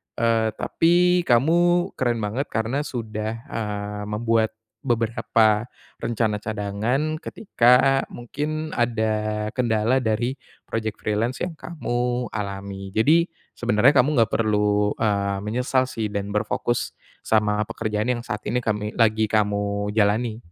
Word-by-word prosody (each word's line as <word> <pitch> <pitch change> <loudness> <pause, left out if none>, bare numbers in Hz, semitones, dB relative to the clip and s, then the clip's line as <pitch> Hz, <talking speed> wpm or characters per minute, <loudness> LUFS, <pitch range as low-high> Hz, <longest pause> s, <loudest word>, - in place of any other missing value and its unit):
eee, 115 -1 +2
tapi 175 +4 +2
kamu 175 +8 +3
keren 120 -3 +1
banget 120 +8 -2
karena 115 +6 -1
sudah, 110 -1 -4
eee, 105 -1 -4
membuat 110 +1 0 0.3
beberapa 115 -2 +2 0.3
rencana 110 -2 -1
cadangan 110 +9 -2
ketika 135 - +3
mungkin 150 +6 -4
ada 110 -2 0
kendala 115 0 +2
dari 120 +2 -1 0.3
project 110 -1 -3
freelance 115 +5 -1
yang 175 -3 -3
kamu 125 -7 -2
alami 100 -2 -6
jadi 155 +11 +4 0.3
sebenarnya 120 +4 +3
kamu 130 +2 +5
nggak 115 - +2
perlu, 105 -2 +2
eee, 100 -3 0
menyesal 125 +4 0
sih 115 -3 -3
dan 100 -1 -3
berfokus 105 +3 -1 0.3
sama 105 -1 +2
pekerjaan 110 +3 -1
yang 120 - -4
saat 105 -3 -5
ini 125 +3 0
kami 105 -2 -2
lagi 110 -1 +3
kamu 105 -1 0
jalani. 110 +2 +1
115 Hz, 120 wpm, -23 LUFS, 105-125 Hz, 0.3 s, kamu